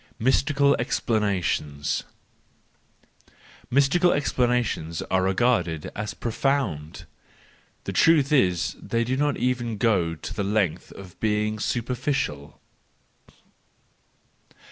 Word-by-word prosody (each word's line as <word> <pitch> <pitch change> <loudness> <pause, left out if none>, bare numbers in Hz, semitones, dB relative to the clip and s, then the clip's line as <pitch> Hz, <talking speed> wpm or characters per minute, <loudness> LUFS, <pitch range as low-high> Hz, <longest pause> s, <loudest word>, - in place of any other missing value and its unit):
Mystical 140 +3 +3
Explanations 95 - -1 1.6
.—Mystical 140 +7 +3
explanations 125 - 0
are 95 - +3
regarded 95 -5 0
as 105 0 -4
profound; 115 - -2 0.8
the - - -5
truth 155 -4 +4
is 90 - +2
that - - -14
they 115 0 +1
do 125 +3 -1
not 145 +1 0
even 120 -3 -1
go 95 -8 +1
the 90 +5 -5
length 100 -4 -1
of 95 -3 -12
being 105 0 0
superficial. 120 - -2
110 Hz, 90 wpm, -25 LUFS, 95-130 Hz, 1.6 s, truth